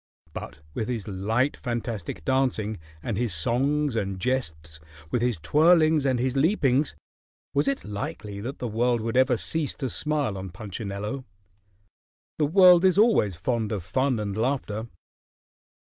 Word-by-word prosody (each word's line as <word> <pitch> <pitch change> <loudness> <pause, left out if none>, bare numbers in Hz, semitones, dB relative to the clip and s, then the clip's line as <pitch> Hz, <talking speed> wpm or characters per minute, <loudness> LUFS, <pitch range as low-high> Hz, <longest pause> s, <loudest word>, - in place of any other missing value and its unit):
But - - -8
with 110 +6 -3
his 115 -5 -3
light, 110 +8 0
fantastic 115 - -4
dancing, 115 -5 0 0.2
and 110 -5 -2
his 115 -6 0
songs 135 - +1
and 95 -3 -2
jests, 80 -10 -3 0.3
with 120 - +1
his 120 -4 +1
twirlings 155 - +4
and 130 -2 +2
his 130 +1 0
leapings, 140 -3 +2 0.6
was 145 +1 +2
it 140 - 0
likely 105 0 -5
that 130 +6 -5
the 125 - -4
world 120 +1 +1
would 115 +1 -3
ever 130 -1 +4
cease 160 +5 -2
to 130 -5 -3
smile 145 -10 -1
on 95 0 -6
Punchinello? 100 +5 -5 1.2
The 150 - +3
world 180 +1 +7
is 185 -1 +4
always 205 - +4
fond 110 +5 -1
of 100 -5 -3
fun 130 +6 0
and 100 -2 -3
laughter. 115 -2 -1
120 Hz, 145 wpm, -26 LUFS, 105-140 Hz, 1.2 s, world